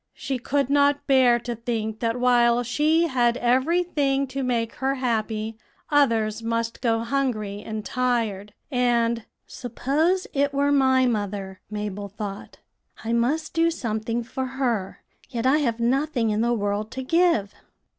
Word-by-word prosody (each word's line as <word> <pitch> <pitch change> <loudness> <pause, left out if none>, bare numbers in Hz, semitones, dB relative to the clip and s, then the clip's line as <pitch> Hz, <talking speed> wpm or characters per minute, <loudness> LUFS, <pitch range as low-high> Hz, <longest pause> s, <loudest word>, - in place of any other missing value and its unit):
She 265 -2 -3
could 280 +2 0
not 285 0 +3
bear 260 -3 +5
to 240 0 -4
think 220 -2 -3
that 230 +1 -1
while 240 -1 +4
she 305 +7 +2
had 245 -6 +2
every 260 +9 +2
thing 275 -5 0
to 270 +1 -3
make 235 -3 -1
her 270 +1 0
happy, 220 -3 -2 0.3
others 230 -6 +2
must 230 0 -2
go 225 -2 +1
hungry 230 -5 -2
and 215 -1 -6
tired; 230 -5 -1 0.2
and 235 -2 +1 0.2
'Suppose 300 +9 -1
it 280 0 +1
were 285 +1 +2
my 260 -2 +4
mother,' 200 -4 -3
Mabel 210 -1 -4
thought; 200 0 -7 0.5
'I 225 +1 -1
must 285 +7 0
do 330 0 +3
something 230 -5 -2
for 260 +3 -4
her; 230 -8 -2 0.3
yet 235 -1 -3
I 275 +4 +4
have 235 -6 -1
nothing 250 -1 +1
in 210 +1 0
the 235 +1 +2
world 205 -1 -1
to 260 - -4
give.' 330 - +2
240 Hz, 150 wpm, -24 LUFS, 220-275 Hz, 0.5 s, bear